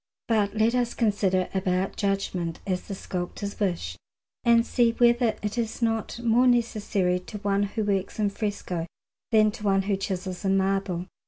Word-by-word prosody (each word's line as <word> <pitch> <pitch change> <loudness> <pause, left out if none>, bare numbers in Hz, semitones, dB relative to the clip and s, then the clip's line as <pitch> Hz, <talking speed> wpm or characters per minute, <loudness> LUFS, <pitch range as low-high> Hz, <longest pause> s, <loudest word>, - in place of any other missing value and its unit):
But 210 -3 +1
let 220 +2 +3
us 245 -1 0
consider 200 -5 +1
about 190 0 0
judgment, 195 -4 -1
as 185 -2 -2
the 195 - -4
sculptors 190 +2 -5
wish, 175 - -1 0.5
and 235 0 +5
see 235 -2 +2
whether 240 -1 +3
it 210 +3 -2
is 225 -1 -2
not 225 -1 -1
more 240 +2 +4
necessary 210 -6 +1
to 195 +4 -8
one 200 -1 0
who 205 +2 -1
works 195 -2 -1
in 210 -2 +1
fresco 200 -5 -3 0.4
than 215 -1 +5
to 215 0 -10
one 195 -1 +2
who 200 0 +1
chisels 185 -1 -4
in 195 0 +2
marble. 190 -2 0
200 Hz, 165 wpm, -26 LUFS, 190-225 Hz, 0.5 s, and